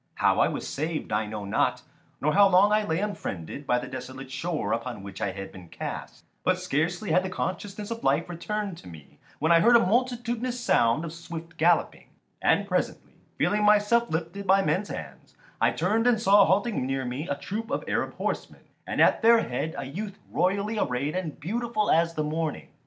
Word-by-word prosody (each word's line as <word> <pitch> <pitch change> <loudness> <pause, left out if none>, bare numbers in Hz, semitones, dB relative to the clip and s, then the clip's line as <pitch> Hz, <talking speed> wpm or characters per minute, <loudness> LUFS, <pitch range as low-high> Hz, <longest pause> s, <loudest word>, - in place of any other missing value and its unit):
How - - +2
I - - +5
was - - -4
saved 155 -1 -3
I 105 0 0
know 105 -1 -5
not, 100 - 0 0.4
nor 150 +2 +1
how 200 0 +7
long 195 +3 +5
I 215 0 +3
lay 160 -6 -1
unfriended 140 - -5
by 125 - +3
the 125 - -3
desolate 130 0 -8
shore 155 +4 -2
upon 115 -3 -4
which 100 -1 -9
I - - 0
had 95 +1 -7
been 90 -3 -12
cast; - - -7 0.2
but - - +2
scarcely 175 +7 -1
had 180 - +4
the 190 - -4
consciousness 200 +3 -4
of 230 0 -5
life 140 +5 +2
returned 195 +2 -4
to - - -14
me 80 -5 -13 0.2
when 160 +2 +1
I 170 - +7
heard 235 +7 +6
a - - +8
multitudinous 240 +2 0
sound 145 - +2
of 160 - -6
swift 165 0 -8
galloping; 170 +1 +1 0.3
and - - +2
presently, - - -2 0.2
feeling 210 0 +1
myself 210 +3 +4
lifted 170 +5 -4
by 195 +1 +5
men's 200 +2 0
hands, - - -8 0.3
I - - +5
turned 225 +3 +1
and 240 -3 +4
saw 205 -2 +6
halting 205 - +1
near 135 -1 -2
me 125 +6 -4
a 140 - -1
troop 215 +10 -5
of 280 - -2
Arab - - -1
horsemen, - - -4 0.3
and - - -3
at - - +5
their 230 0 +6
head 155 +6 -3
a 140 - -4
youth 195 +9 -6
royally 200 +4 0
arrayed 140 +3 -1
and 175 -5 -4
beautiful 215 +5 -1
as 165 +1 +3
the 155 - 0
morning. 155 0 -3
170 Hz, 195 wpm, -27 LUFS, 140-210 Hz, 0.4 s, a